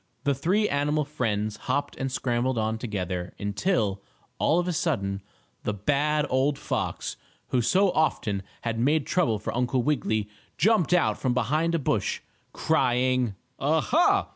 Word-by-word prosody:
The 140 Hz, -, +2 dB
three 185 Hz, +10 st, +1 dB
animal 150 Hz, +1 st, +1 dB
friends 110 Hz, -7 st, -2 dB
hopped 145 Hz, +2 st, 0 dB
and 135 Hz, -1 st, -3 dB
scrambled 120 Hz, 0 st, 0 dB
on 110 Hz, 0 st, 0 dB
together, 90 Hz, -6 st, -4 dB
until, 100 Hz, -, 0 dB, 0.4 s
all 160 Hz, -, +3 dB
of 175 Hz, 0 st, +1 dB
a 180 Hz, -, 0 dB
sudden, 100 Hz, -, -1 dB, 0.4 s
the 105 Hz, -, -1 dB
bad 145 Hz, +7 st, +1 dB
old 135 Hz, +2 st, +1 dB
fox, 150 Hz, -, -3 dB, 0.3 s
who 125 Hz, -, +2 dB
so 185 Hz, -, +3 dB
often 105 Hz, -10 st, 0 dB, 0.2 s
had 115 Hz, -1 st, -2 dB
made 145 Hz, +4 st, +2 dB
trouble 145 Hz, -12 st, +1 dB
for 105 Hz, -, -5 dB
Uncle 125 Hz, 0 st, +1 dB
Wiggily, 110 Hz, -7 st, 0 dB, 0.3 s
jumped 200 Hz, -2 st, +3 dB
out 180 Hz, -2 st, +3 dB
from 125 Hz, -2 st, 0 dB
behind 160 Hz, +6 st, +1 dB
a -, -, +3 dB
bush, 145 Hz, -, -1 dB, 0.3 s
crying: 125 Hz, -3 st, +1 dB, 0.2 s
"Ah, 155 Hz, +4 st, +2 dB
ha! 325 Hz, -, +3 dB
130 Hz, 150 wpm, -26 LUFS, 110-155 Hz, 0.4 s, all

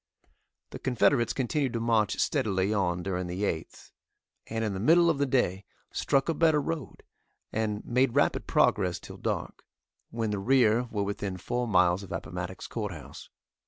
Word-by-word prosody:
The -, -, -7 dB
Confederates 125 Hz, -1 st, +2 dB
continued 135 Hz, 0 st, -1 dB
to 115 Hz, -, -1 dB
march 115 Hz, -3 st, +1 dB
steadily 95 Hz, -1 st, +1 dB
on 90 Hz, -4 st, 0 dB
during 90 Hz, -1 st, -2 dB
the 90 Hz, +3 st, -4 dB
8th, 80 Hz, -6 st, -4 dB, 0.6 s
and 110 Hz, 0 st, -2 dB
in 105 Hz, -, -2 dB
the 95 Hz, -, -4 dB
middle 165 Hz, -, +5 dB
of 145 Hz, -, -3 dB
the 140 Hz, -, +2 dB
day 100 Hz, -8 st, +1 dB, 0.3 s
struck 135 Hz, -1 st, +1 dB
a 165 Hz, -, +1 dB
better 160 Hz, -1 st, +3 dB
road, 150 Hz, -1 st, -5 dB, 0.5 s
and 105 Hz, -1 st, -2 dB
made 125 Hz, 0 st, +1 dB
rapid -, -, +2 dB
progress 90 Hz, -1 st, +2 dB
till -, -, -11 dB
dark, -, -, -4 dB, 0.5 s
when 115 Hz, -2 st, -2 dB
the 105 Hz, -, -2 dB
rear 120 Hz, +1 st, +3 dB
were 105 Hz, -4 st, -2 dB
within 100 Hz, -1 st, -3 dB
four 120 Hz, +6 st, -2 dB
miles 90 Hz, -3 st, +3 dB
of 100 Hz, -2 st, -10 dB
Appomattox 90 Hz, -1 st, -5 dB
Courthouse. 100 Hz, -10 st, -6 dB
110 Hz, 160 wpm, -28 LUFS, 95-125 Hz, 0.6 s, middle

